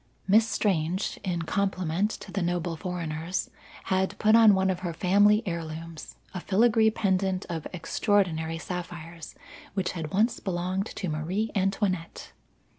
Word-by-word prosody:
Miss 220 +3 +5
Strange, 185 -3 0
in 175 -4 -1
compliment 185 +1 0
to - - -8
the 195 - -2
noble 175 -1 -1
foreigners, 165 0 -3 0.3
had 190 0 0
put 215 +1 +4
on 220 -3 +7
one 190 0 +2
of 180 - -3
her 175 -2 -4
family 205 +5 +4
heirlooms 165 -2 -6 0.2
a 185 - -3
filigree 220 +4 +3
pendant 190 -3 0
of 165 -2 -4
extraordinary 170 -3 0
sapphires 170 -2 -7 0.4
which 190 -2 0
had 160 -4 -5
once 220 +5 +2
belonged 185 +1 -2
to 190 - -5
Marie 175 +8 -2
Antoinette. 195 -3 -1
185 Hz, 135 wpm, -27 LUFS, 165-200 Hz, 0.4 s, on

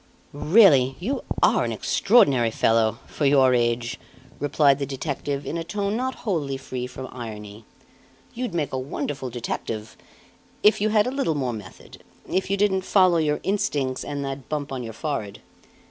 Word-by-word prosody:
"Really 145 - +5
you 245 +10 -3 0.2
are - - +4
an - - -2
extraordinary 140 - +3
fellow 115 0 +2
for 145 - -1
your 135 -2 +5
age!" 120 +1 0 0.4
replied 145 -1 +3
the 140 - -1
detective 140 +1 -4
in 170 - -3
a - - -3
tone 200 +4 -2
not 260 +2 -2
wholly 150 -10 -1
free 130 -1 -5
from 130 +1 -8
irony. 105 -3 -8 0.7
"You'd 245 -6 -4
make 150 -5 -1
a 130 - -1
wonderful 135 0 -4
detective 115 -2 -5 0.7
if 210 -1 +5
you 215 - +2
had 210 -1 +3
a 250 - -1
little 270 - 0
more 130 -4 -1
method 105 -4 -11 0.3
if 190 0 -1
you 200 - +1
didn't 195 -1 +2
follow 185 -2 +4
your 150 -2 0
instincts 145 -10 -1
and 145 -1 -4
that 135 -1 -6
bump 145 -2 -3
on 130 -2 -4
your 115 -2 -6
forehead. 115 -6 -4
140 Hz, 165 wpm, -24 LUFS, 125-185 Hz, 0.7 s, Really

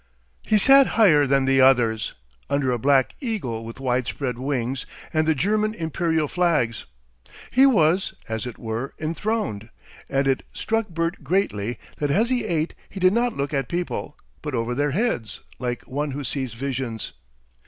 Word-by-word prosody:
He 215 - +3
sat 270 +5 +7
higher 155 -10 +6
than 135 0 +3
the 135 0 +4
others, 120 -4 +3 0.3
under 140 -2 +1
a 120 - -1
black 135 +1 +3
eagle 180 - -3
with 115 +3 -9
widespread 125 -1 -1
wings 130 -1 -2 0.3
and 155 0 +2
the 160 - +3
German 215 +8 +1
Imperial 160 -3 0
flags; 150 - 0 0.7
he 265 +2 +6
was, 185 - +3
as 110 +2 -3
it 120 - -7
were, 115 +3 -4
enthroned, 160 - -2 0.4
and 135 0 +1
it 135 -1 +2
struck 225 -1 -1
Bert 165 -1 -2
greatly 120 - 0 0.2
that 145 - -1
as 220 - +2
he 245 -3 +1
ate 165 -5 -1 0.2
he 195 - -7
did 185 +1 +4
not 240 +1 +1
look 140 +2 -2
at 135 -3 -1
people, 175 -3 -3 0.2
but 150 -4 -4
over 115 +1 -1
their 145 +3 +1
heads 140 - -1 0.2
like 125 -1 -3
one 145 +3 -3
who 140 +1 -4
sees 130 -2 -3
visions. 125 -3 -4
140 Hz, 165 wpm, -24 LUFS, 125-180 Hz, 0.7 s, sat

